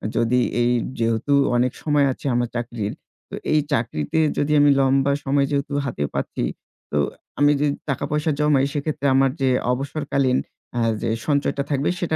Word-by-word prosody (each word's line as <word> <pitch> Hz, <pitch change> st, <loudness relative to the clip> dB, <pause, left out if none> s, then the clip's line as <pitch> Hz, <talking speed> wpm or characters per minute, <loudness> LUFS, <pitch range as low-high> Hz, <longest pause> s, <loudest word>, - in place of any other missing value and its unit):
যদি 120 Hz, +2 st, +2 dB, 0.2 s
এই 120 Hz, +1 st, +3 dB, 0.3 s
যেহেতু 115 Hz, +5 st, +1 dB, 0.2 s
অনেক 125 Hz, +1 st, +2 dB
সময় 145 Hz, -2 st, +3 dB
আছে -, -, -9 dB
আমার 120 Hz, -1 st, 0 dB
চাকরির। 120 Hz, -3 st, -3 dB, 0.4 s
তো -, -, -6 dB, 0.2 s
এই 155 Hz, -, +5 dB
চাকরিতে 115 Hz, -, -1 dB, 0.2 s
যদি 150 Hz, +1 st, 0 dB
আমি 145 Hz, -, +6 dB
লম্বা 135 Hz, +1 st, +3 dB
সময় 140 Hz, 0 st, +2 dB
যেহেতু 140 Hz, 0 st, -1 dB
হাতে 95 Hz, -, -3 dB
পাচ্ছি, -, -, -3 dB, 0.5 s
তো 75 Hz, -, 0 dB, 0.4 s
আমি 145 Hz, 0 st, +5 dB
যদি 145 Hz, -1 st, +1 dB, 0.2 s
টাকা-পয়সা 150 Hz, +3 st, -1 dB
জমাই 145 Hz, -2 st, +3 dB
সেক্ষেত্রে 145 Hz, -1 st, -3 dB
আমার 135 Hz, -1 st, +4 dB
যে 130 Hz, -, +3 dB, 0.2 s
অবসরকালীন 135 Hz, -1 st, 0 dB, 0.4 s
অ্যা 120 Hz, -, -1 dB, 0.2 s
যে -, -, -1 dB, 0.2 s
সঞ্চয়টা 140 Hz, -1 st, +1 dB
থাকবে, 140 Hz, -1 st, 0 dB
সেটা 165 Hz, -3 st, -1 dB
135 Hz, 160 wpm, -22 LUFS, 120-145 Hz, 0.5 s, আমি